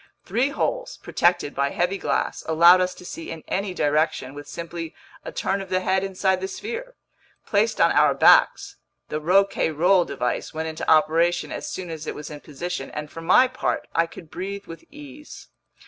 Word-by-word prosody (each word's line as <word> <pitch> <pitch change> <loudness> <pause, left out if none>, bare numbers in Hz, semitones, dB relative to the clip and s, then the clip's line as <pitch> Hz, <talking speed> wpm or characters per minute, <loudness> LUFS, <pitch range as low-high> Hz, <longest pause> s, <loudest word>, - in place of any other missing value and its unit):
Three 250 +5 +1
holes, - - -2
protected 175 -4 +1
by 140 0 0
heavy 180 +6 -1
glass, - - -1
allowed 170 +3 +6
us 180 0 -1
to 180 - -13
see 165 - -7
in 165 -1 -7
any 195 0 -2
direction 150 -5 0
with 145 0 -10
simply 165 0 -7 0.3
a - - -7
turn 195 +1 -1
of 195 - -9
the 185 0 +1
head 190 0 +1
inside 190 -1 0
the 190 - -2
sphere. 475 - -6 0.5
Placed 460 - +1
on - - +5
our - - +4
backs, - - +4 0.3
the 150 - -3
Rouquayrol 180 0 +3
device 125 +3 -3
went 160 +1 -3
into 160 - -4
operation 165 +3 +3
as - - -5
soon 180 -3 -6
as 155 -1 -7
it - - -4
was 150 +1 -8
in 150 - -8
position, 150 0 -6
and 150 0 -7
for 165 - -8
my 185 +10 +5
part, 255 0 -3
I 165 0 +2
could 165 -1 -13
breathe 200 +2 -6
with 165 - -10
ease. 295 0 -12
175 Hz, 185 wpm, -23 LUFS, 160-195 Hz, 0.5 s, allowed